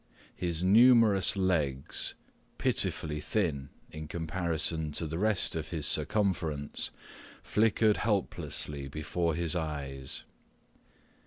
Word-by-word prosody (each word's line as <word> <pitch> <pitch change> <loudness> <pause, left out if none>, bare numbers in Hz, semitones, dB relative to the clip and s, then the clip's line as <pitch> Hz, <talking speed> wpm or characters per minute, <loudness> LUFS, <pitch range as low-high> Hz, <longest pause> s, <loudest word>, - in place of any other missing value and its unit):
His 85 -1 -2
numerous 110 -1 +5
legs, 75 -8 0 0.4
pitifully 75 -1 -1
thin 75 -9 -1 0.2
in 75 0 -7
comparison 80 -1 -1
to 80 - 0
the 80 +2 -4
rest 105 -4 +2
of 80 -1 -4
his 80 -4 -2
circumference, 85 -8 0 0.5
flickered 110 0 +2
helplessly 80 -8 -2
before 80 +3 -2
his 85 +1 0
eyes. 70 -5 -4
80 Hz, 95 wpm, -30 LUFS, 75-95 Hz, 0.5 s, numerous